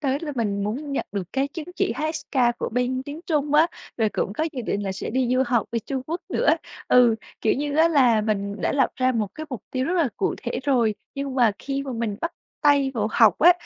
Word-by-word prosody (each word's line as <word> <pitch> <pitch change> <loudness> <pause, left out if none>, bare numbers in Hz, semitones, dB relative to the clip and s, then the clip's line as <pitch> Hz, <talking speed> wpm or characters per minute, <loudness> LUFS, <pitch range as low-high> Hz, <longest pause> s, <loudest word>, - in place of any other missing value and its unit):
tới 275 -1 0
là 300 -3 -4
mình 205 -4 -1
muốn 280 +7 -3
nhận - - -2
được 200 -2 -1
cái 270 +1 0
chứng 310 +1 -7
chỉ - - +1
HSK 270 -3 0
của - - -2
bên 250 +2 -1
tiếng 290 +4 -7
Trung 295 -2 0
á, 315 +2 +6 0.3
rồi 220 -2 +2
cũng 200 - -2
có 310 - -1
dự 250 -3 -4
định 205 -1 -2
là 195 -1 -2
sẽ 190 - -5
đi 255 +1 +1
du 255 - +3
học 240 -4 +1
bên 230 - -1
Trung 270 -2 -2
Quốc 335 +3 -3
nữa. - - 0 0.4
Ừ, 245 -2 +6 0.3
kiểu 220 - +3
như 290 +1 -2
á, 325 +1 +6
là 250 -8 +4
mình 205 -1 -2
đã - - 0
lập 270 -3 +3
ra 255 0 +2
một 215 -4 -1
cái 310 0 -6
mục 245 -6 -5
tiêu 255 0 -1
rất 355 - 0
là 335 -6 +2
cụ 385 - 0
thể - - -2
rồi, 240 -6 +2 0.2
nhưng 275 -1 -4
mà 240 -5 +4
khi 275 0 -3
mà 270 - -5
mình 225 -3 -2
bắt 335 +1 -2 0.3
tay 285 -2 +4
vào 215 -2 0
học 225 0 +5
á, 350 +3 +8
260 Hz, 250 wpm, -24 LUFS, 225-290 Hz, 0.4 s, á